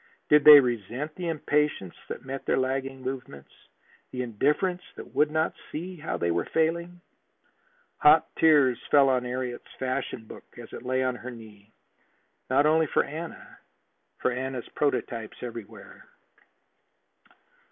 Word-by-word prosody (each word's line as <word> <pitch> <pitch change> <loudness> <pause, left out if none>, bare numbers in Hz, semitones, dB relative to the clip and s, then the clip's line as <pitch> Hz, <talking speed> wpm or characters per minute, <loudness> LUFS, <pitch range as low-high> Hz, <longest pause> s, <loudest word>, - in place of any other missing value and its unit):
Did 150 -1 +5
they 150 -1 +12
resent 125 +4 -2
the 180 0 -5
impatience 150 - 0 0.2
that - - -7
met 135 0 -6
their - - +2
lagging 135 0 -2
movements, 130 - -7 0.6
the 125 0 -4
indifference 150 - 0
that - - -11
would 150 - +3
not 155 +1 0 0.2
see 180 +4 -5
how 155 - -4
they 85 - 0
were 85 - 0
failing? 170 +2 0 1.0
Hot 155 +2 +6
tears 145 -6 +5
fell 140 -2 +5
on 125 -1 +1
Harriet's 125 0 -5
fashion 130 -3 -3
book - - -14
as 120 -1 -11
it - - -7
lay 130 +1 0
on 130 -1 0
her 125 - -8
knee. 110 -3 -13 0.8
Not 135 +3 +3
only 160 +1 +3
for - - +2
Anna 160 +4 -8 0.6
for - - 0
Anna's 130 -1 -4
prototypes 120 -6 -2
everywhere. 115 -4 -10
130 Hz, 140 wpm, -27 LUFS, 125-150 Hz, 1.0 s, they